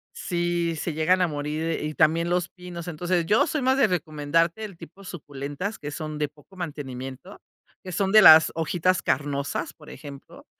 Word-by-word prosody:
sí, 175 Hz, -1 st, -1 dB
se 160 Hz, +1 st, -3 dB
llegan 180 Hz, +4 st, +2 dB
a -, -, +2 dB
morir, 150 Hz, +2 st, -3 dB
y 155 Hz, 0 st, -4 dB
también 165 Hz, +2 st, +2 dB
los 180 Hz, 0 st, 0 dB
pinos. 180 Hz, -2 st, -9 dB
Entonces, 175 Hz, +1 st, -1 dB
yo 215 Hz, -, +3 dB
soy 300 Hz, -3 st, -2 dB
más 260 Hz, +1 st, +3 dB
de 225 Hz, -, +5 dB
recomendarte 165 Hz, +3 st, 0 dB
el 195 Hz, -5 st, -8 dB
tipo 175 Hz, +4 st, -13 dB
suculentas, 145 Hz, +3 st, -6 dB
que 145 Hz, -, -6 dB
son 155 Hz, 0 st, -6 dB
de 150 Hz, -1 st, -1 dB
poco 150 Hz, +6 st, -21 dB
mantenimiento, 140 Hz, 0 st, -7 dB, 0.4 s
que 185 Hz, -, -7 dB
son 190 Hz, +2 st, 0 dB
de 215 Hz, 0 st, +8 dB
las 160 Hz, -3 st, +9 dB
hojitas 175 Hz, +3 st, 0 dB
carnosas, 140 Hz, +3 st, -2 dB
por 150 Hz, -2 st, -16 dB
ejemplo. 140 Hz, -2 st, -11 dB
165 Hz, 175 wpm, -25 LUFS, 150-180 Hz, 0.4 s, las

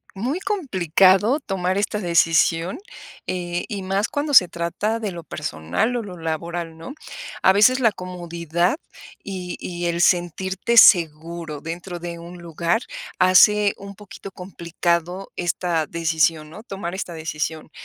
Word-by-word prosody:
muy 255 Hz, -, -2 dB
complicado 205 Hz, -, +2 dB
tomar 185 Hz, -4 st, -2 dB
esta 210 Hz, +1 st, -1 dB
decisión, 170 Hz, -, +2 dB, 0.5 s
eh, 175 Hz, -1 st, -3 dB
y 200 Hz, -3 st, -5 dB
más 195 Hz, +3 st, 0 dB
cuando 290 Hz, -1 st, -1 dB
se 180 Hz, -, +8 dB
trata 170 Hz, +7 st, -2 dB
de 210 Hz, -3 st, -3 dB
lo 170 Hz, -2 st, -8 dB
personal 150 Hz, -, -2 dB
o 235 Hz, -, -2 dB
lo 180 Hz, -3 st, -9 dB
laboral, 165 Hz, +1 st, -4 dB
¿no?, 165 Hz, +12 st, -8 dB, 0.5 s
a 190 Hz, -, +6 dB
veces 250 Hz, +6 st, +5 dB
la 230 Hz, -3 st, +4 dB
comodidad 175 Hz, -, -2 dB, 0.5 s
y 185 Hz, -3 st, -6 dB
y 175 Hz, -1 st, -5 dB
el 170 Hz, 0 st, -1 dB
sentirte 190 Hz, +6 st, +1 dB
seguro 165 Hz, -5 st, +4 dB
dentro 175 Hz, +2 st, -6 dB
de 170 Hz, 0 st, -6 dB
un 175 Hz, +1 st, -10 dB
lugar 170 Hz, +7 st, -1 dB, 0.3 s
hace 200 Hz, +3 st, +5 dB
un 200 Hz, 0 st, -10 dB
poquito 200 Hz, 0 st, -11 dB
complicado 175 Hz, 0 st, -3 dB
esta 170 Hz, -2 st, -1 dB
decisión, 160 Hz, -1 st, 0 dB
¿no?, 205 Hz, -, -10 dB
tomar 195 Hz, -7 st, -6 dB
esta 185 Hz, -2 st, -5 dB
decisión, 160 Hz, 0 st, -4 dB
175 Hz, 140 wpm, -22 LUFS, 170-200 Hz, 0.5 s, se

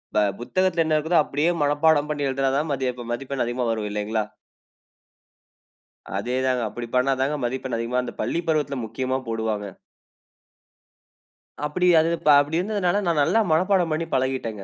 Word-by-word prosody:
ப -, -, +4 dB, 0.2 s
புத்தகத்துல 180 Hz, +6 st, +1 dB
என்ன 155 Hz, -, +1 dB
இருக்குதோ 160 Hz, +3 st, +1 dB
அப்டியே 145 Hz, +4 st, 0 dB
மனப்பாடம் 145 Hz, +1 st, +3 dB
பண்ணி 145 Hz, -2 st, -1 dB
எழுதுனா 135 Hz, 0 st, 0 dB
தான் 150 Hz, 0 st, -1 dB
மதிய 130 Hz, -2 st, -1 dB, 0.2 s
மதிப்பெண் 135 Hz, +2 st, -3 dB
அதிகமா 120 Hz, +1 st, -2 dB
வரும் 110 Hz, -2 st, -2 dB
இல்லைங்களா? 105 Hz, +1 st, -1 dB, 1.9 s
அதே 125 Hz, +5 st, -2 dB
தாங்க. 130 Hz, -1 st, +1 dB
அப்படி 120 Hz, +2 st, -6 dB
பண்ணாதாங்க 135 Hz, +3 st, +1 dB
மதிப்பெண் 130 Hz, 0 st, -3 dB
அதிகமா 120 Hz, +2 st, -1 dB
அந்த 120 Hz, -, -6 dB
பள்ளி 170 Hz, -, -1 dB
பருவத்துல 150 Hz, -3 st, 0 dB
முக்கியமா 130 Hz, +4 st, -2 dB
போடுவாங்க. 110 Hz, -2 st, -2 dB, 2.0 s
அப்டி 180 Hz, +5 st, 0 dB
அது 160 Hz, -, +2 dB, 0.3 s
அப்டி 145 Hz, +3 st, 0 dB
இருந்ததனால 200 Hz, 0 st, 0 dB
நா -, -, +4 dB
நல்லா 185 Hz, +10 st, +3 dB
மனப்பாடம் 180 Hz, 0 st, +2 dB
பண்ணி 165 Hz, +2 st, -1 dB
பழகிட்டேங்க. 130 Hz, -6 st, -1 dB
135 Hz, 140 wpm, -24 LUFS, 120-160 Hz, 2.0 s, ப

